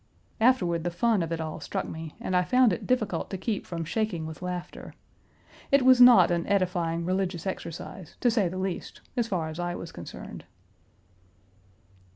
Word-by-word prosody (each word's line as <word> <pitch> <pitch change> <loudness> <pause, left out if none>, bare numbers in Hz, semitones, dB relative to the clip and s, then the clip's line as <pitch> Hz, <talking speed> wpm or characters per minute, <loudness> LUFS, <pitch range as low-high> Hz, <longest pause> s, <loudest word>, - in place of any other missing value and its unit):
Afterward 185 -9 +3
the 175 - 0
fun 205 +4 +1
of 165 -1 -3
it 165 - -2
all 155 -1 -4
struck - - -3
me, 160 -1 -7
and 185 - -2
I 180 - +4
found 250 +1 +4
it - - -5
difficult 215 -9 0
to 190 - -4
keep 205 +2 -3
from 165 -2 -4
shaking 190 -3 -2
with 160 +1 -8
laughter. 180 -1 -6 0.8
It 275 -1 +5
was 255 -1 +7
not 235 -9 +8
an 170 -1 0
edifying 175 -4 0
religious 185 -1 -1
exercise, 180 -2 -6
to 245 - +3
say 215 -5 +2
the 185 - -6
least, 185 -1 -4
as 240 -3 0
far 175 -7 -1
as 160 +2 -7
I 175 0 -2
was 165 - -7
concerned. 85 - -9
180 Hz, 180 wpm, -27 LUFS, 170-215 Hz, 0.8 s, not